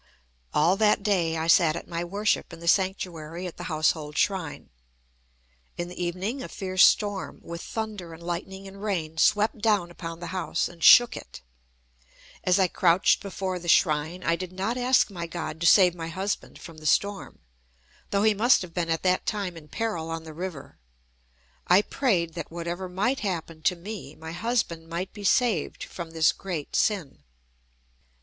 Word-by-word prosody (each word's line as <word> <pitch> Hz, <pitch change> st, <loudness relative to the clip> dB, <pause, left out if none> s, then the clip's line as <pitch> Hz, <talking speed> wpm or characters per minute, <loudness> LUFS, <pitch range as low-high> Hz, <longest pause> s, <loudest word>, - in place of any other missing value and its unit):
All 170 Hz, +6 st, +3 dB
that 210 Hz, -1 st, +3 dB
day 175 Hz, -6 st, +1 dB
I 160 Hz, -, -1 dB
sat 165 Hz, -1 st, +5 dB
at 170 Hz, -, -7 dB
my 170 Hz, 0 st, -3 dB
worship 200 Hz, +4 st, -1 dB
in 165 Hz, -, -10 dB
the 170 Hz, -, -8 dB
sanctuary 180 Hz, -3 st, 0 dB
at 180 Hz, -, -7 dB
the 175 Hz, -, -7 dB
household 155 Hz, -1 st, 0 dB
shrine. 185 Hz, -7 st, -1 dB, 1.1 s
In 175 Hz, 0 st, -3 dB
the 180 Hz, 0 st, -5 dB
evening 190 Hz, +9 st, -3 dB
a -, -, -5 dB
fierce 185 Hz, -2 st, +2 dB
storm, 205 Hz, -2 st, +2 dB
with 170 Hz, 0 st, -7 dB
thunder 215 Hz, -6 st, -5 dB
and 165 Hz, +1 st, -11 dB
lightning 190 Hz, +3 st, -5 dB
and 195 Hz, +1 st, -11 dB
rain, 165 Hz, -7 st, -3 dB
swept 210 Hz, +4 st, +3 dB
down 205 Hz, -5 st, +1 dB
upon 165 Hz, -1 st, -7 dB
the 175 Hz, 0 st, -6 dB
house 180 Hz, -2 st, -1 dB
and 170 Hz, -2 st, -11 dB
shook 240 Hz, +7 st, +8 dB
it. -, -, -10 dB, 1.0 s
As 180 Hz, 0 st, +3 dB
I 190 Hz, -2 st, +4 dB
crouched 175 Hz, +1 st, +3 dB
before 190 Hz, -2 st, -4 dB
the 170 Hz, -, -10 dB
shrine, 160 Hz, +1 st, +2 dB
I 165 Hz, -, +2 dB
did 185 Hz, +1 st, -6 dB
not 195 Hz, +6 st, -2 dB
ask 250 Hz, -2 st, +3 dB
my 170 Hz, -3 st, -5 dB
God 160 Hz, -2 st, -5 dB
to 170 Hz, -, +3 dB
save 180 Hz, -3 st, +7 dB
my 165 Hz, -2 st, -6 dB
husband 190 Hz, +5 st, -4 dB
from 165 Hz, -2 st, -11 dB
the 155 Hz, -, -5 dB
storm, 200 Hz, +5 st, 0 dB, 0.7 s
though 200 Hz, 0 st, +1 dB
he 220 Hz, 0 st, +5 dB
must 225 Hz, +2 st, +4 dB
have 175 Hz, -2 st, -10 dB
been 170 Hz, -1 st, -2 dB
at 165 Hz, 0 st, -1 dB
that 185 Hz, 0 st, +1 dB
time 200 Hz, -4 st, -2 dB
in 155 Hz, -2 st, -12 dB
peril 170 Hz, -6 st, -3 dB
on 165 Hz, 0 st, -4 dB
the 160 Hz, -1 st, -10 dB
river. 170 Hz, -3 st, -7 dB, 0.9 s
I 185 Hz, +4 st, +6 dB
prayed 180 Hz, -, 0 dB
that 165 Hz, -2 st, -6 dB
whatever 175 Hz, +2 st, -5 dB
might 210 Hz, +9 st, 0 dB
happen 165 Hz, -5 st, -4 dB
to 180 Hz, -, +2 dB
me, 180 Hz, -4 st, -8 dB
my 160 Hz, 0 st, -8 dB
husband 175 Hz, -4 st, -2 dB
might 175 Hz, +3 st, -4 dB
be 205 Hz, -, -9 dB
saved 220 Hz, -, +1 dB
from 170 Hz, -2 st, -7 dB
this 160 Hz, -1 st, +3 dB
great 175 Hz, -7 st, -5 dB
sin. 175 Hz, -, 0 dB
180 Hz, 180 wpm, -26 LUFS, 165-200 Hz, 1.1 s, shook